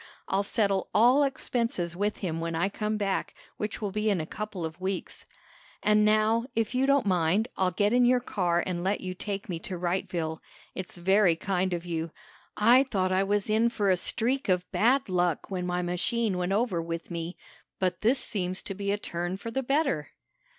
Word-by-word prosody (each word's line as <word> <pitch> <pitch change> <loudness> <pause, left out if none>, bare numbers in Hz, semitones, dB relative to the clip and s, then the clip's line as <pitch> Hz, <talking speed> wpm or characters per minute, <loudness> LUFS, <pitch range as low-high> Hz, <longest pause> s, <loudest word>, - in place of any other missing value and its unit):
I'll 195 - +1
settle 200 -2 0
all 245 +6 +6
expenses 230 -10 -1
with 205 +3 -1
him 165 -2 -2
when 165 0 -3
I 175 +4 +1
come 215 +1 -2
back, 200 -2 -2 0.2
which 210 +1 -4
will 205 - -1
be 215 +2 0
in 200 -4 +1
a 155 - -2
couple 200 -1 -5
of 160 +3 -7
weeks. 190 0 -4 0.6
"And 210 0 +4
now, 215 +2 +3
if 225 +1 0
you 260 +2 +2
don't 275 -3 +3
mind, 185 +4 +2
I'll 185 -1 +2
get 205 +4 +1
in 245 0 +5
your 250 +1 +4
car 175 -7 0
and 175 -2 -3
let 195 +2 0
you 185 -1 -4
take 200 +1 -5
me 170 -3 -4
to 180 +2 -6
Wrightville. 170 -2 -2 0.3
It's 185 -1 -7
very 190 0 +4
kind 185 +1 -1
of 175 0 -3
you. 165 -1 -3 0.5
I 235 +5 +6
thought 195 -9 0
I 185 +1 +3
was 205 +1 0
in 220 +2 +3
for 205 -4 +1
a - - +5
streak 250 +7 0
of 180 -1 +2
bad 255 +5 +3
luck 180 -2 0
when 180 -1 -2
my 180 0 -1
machine 190 +4 0
went 180 +1 -1
over 200 -4 +1
with 165 +1 -5
me, 170 +1 -4 0.4
but 185 -2 -1
this 240 +5 +3
seems 185 -6 -3
to 195 - -5
be 200 +1 -2
a 205 - +1
turn 175 -1 -4
for 230 +4 -6
the 265 - -1
better." 270 - 0
195 Hz, 200 wpm, -28 LUFS, 175-215 Hz, 0.6 s, all